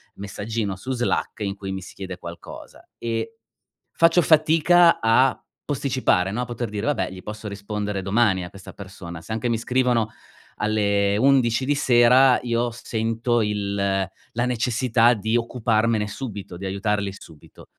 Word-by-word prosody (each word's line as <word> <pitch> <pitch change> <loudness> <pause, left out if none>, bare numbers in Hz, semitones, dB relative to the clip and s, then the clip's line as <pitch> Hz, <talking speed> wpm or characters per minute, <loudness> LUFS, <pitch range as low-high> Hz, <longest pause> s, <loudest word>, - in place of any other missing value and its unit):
messaggino 100 0 -4
su 130 +8 -6
Slack 120 -2 -1
in 100 -1 -3
cui 95 -1 -6
mi 95 0 -4
si 95 - -11
chiede 95 -2 -7
qualcosa. 85 -1 -11
E 115 - -4 0.6
faccio 165 +1 +4
fatica 165 +2 +5
a 125 +4 +3 0.3
posticipare, 130 -10 +1
no, 120 +4 -2
poter 120 -2 -4
dire: 105 +3 -3
"Vabbè, 95 -12 0
gli 95 -1 -10
posso 110 0 -8
rispondere 100 0 -4
domani 100 -1 +2
a 90 - -6
questa 100 -1 -12
persona". 90 -4 -9
Se 110 - -8
anche 115 +2 -1
mi 115 - 0
scrivono 125 -2 +1 0.5
alle 100 -1 +1
11 130 -1 +3
di 145 +2 +1
sera, 125 -1 +5
io 120 0 0
s 115 - -12
sento 115 +1 0
il 105 -1 -2
la 100 +4 -2
necessità 120 0 +2
di 110 +2 -2
occuparmene 115 -2 0
subito, 100 -5 -7
di 95 - -6
aiutarli 100 +1 -1
subito. 80 -5 -15
110 Hz, 150 wpm, -23 LUFS, 100-125 Hz, 0.6 s, fatica